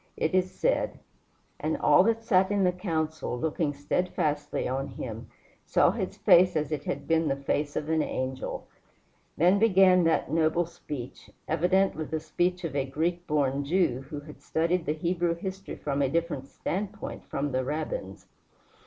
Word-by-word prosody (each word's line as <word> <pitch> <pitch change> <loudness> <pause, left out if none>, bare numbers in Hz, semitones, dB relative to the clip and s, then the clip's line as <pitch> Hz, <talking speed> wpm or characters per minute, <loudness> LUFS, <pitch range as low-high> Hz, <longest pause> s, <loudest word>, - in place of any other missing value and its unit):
It 160 - 0
is 185 0 +2
said: - - 0 0.6
"And - - -1
all - - +5
that 225 0 +1
sat 190 -4 +3
in 205 -1 +1
the 180 - +4
council, 160 -7 -2
looking 160 0 0
steadfastly 150 0 -1
on 135 +2 -2
him, 115 -1 -7 0.3
saw - - +3
his - - -4
face 180 +1 +5
as 155 -1 -1
it 150 -2 -3
had 140 - -4
been 165 -1 +2
the 135 - +1
face 145 +1 -2
of 150 - -2
an 160 0 +2
angel." 130 -2 -3 0.7
Then 180 +5 +4
began 190 -4 +5
that 165 -4 +1
noble 160 +1 +2
speech, 150 -6 -8 0.2
evidently 180 0 +2
the 160 +1 -3
speech 180 +3 -1
of 160 -4 -4
a 140 - +2
Greek 165 +6 -2
born 140 -2 +1
Jew, 140 -5 +1
who 150 -2 -5
had 150 +1 -13
studied 165 +2 0
the 150 - +2
Hebrew 170 +1 0
history 190 +3 -6
from 140 -1 -2
a 135 - +2
different 165 -3 -1
standpoint 195 +7 -5
from 140 +1 -2
the 130 0 0
Rabbins. 155 - -4
160 Hz, 165 wpm, -28 LUFS, 145-180 Hz, 0.7 s, all